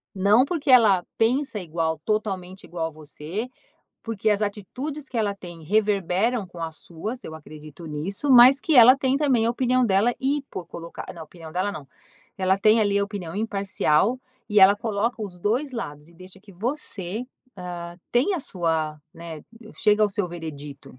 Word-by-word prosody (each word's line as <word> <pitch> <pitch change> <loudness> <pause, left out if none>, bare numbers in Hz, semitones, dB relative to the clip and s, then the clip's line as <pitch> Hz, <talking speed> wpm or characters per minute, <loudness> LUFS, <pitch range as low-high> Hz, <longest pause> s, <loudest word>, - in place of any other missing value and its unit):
Não 205 +6 +4
porque 315 -1 -3
ela 210 -8 +6
pensa 245 0 +1
igual, 160 -2 -2
totalmente 195 -4 -2
igual 165 -2 -4
a - - -6
você, 155 - -7 0.5
porque 220 -2 -2
as 210 0 +2
atitudes 260 +9 -5
que 250 - -7
ela 210 -3 0
tem 175 -3 -11
reverberam 205 +3 +1
com 175 -1 -11
as 160 -1 -5
suas, 215 +9 -7
eu 160 - -8
acredito 155 +1 -12
nisso, 170 - -3
mas 255 +3 +8
que 320 -1 0
ela 250 +1 +9
tem 270 -1 +1
também 265 -6 +2
a - - +2
opinião 255 +1 +1
dela 205 +5 +3
e 280 +2 0
por 180 - -6
colocar 170 0 -8
não, 165 - -9
opinião 160 0 -12
dela 185 +4 0
não. 150 -7 -8 0.5
Ela 190 +1 +1
tem 215 +3 +5
ali 200 -1 +2
a 200 - +2
opinião 195 -5 -7
imparcial 200 0 +1 0.3
e 210 - +3
ela 195 +1 +8
coloca 220 +2 -2
os 185 -4 -7
2 240 +10 0
lados 150 -10 -6
e 170 - -20
deixa 185 +2 -14
que 200 0 -16
você, 215 -1 -4 0.3
ah, 175 -1 -7
tenha 290 +11 +2
a - - -6
sua, 160 - -2
né, 165 -2 -9 0.3
chega 210 0 +3
ao 210 - +3
seu 195 -1 -1
veredito. 145 -6 -9
200 Hz, 175 wpm, -24 LUFS, 170-230 Hz, 0.5 s, ela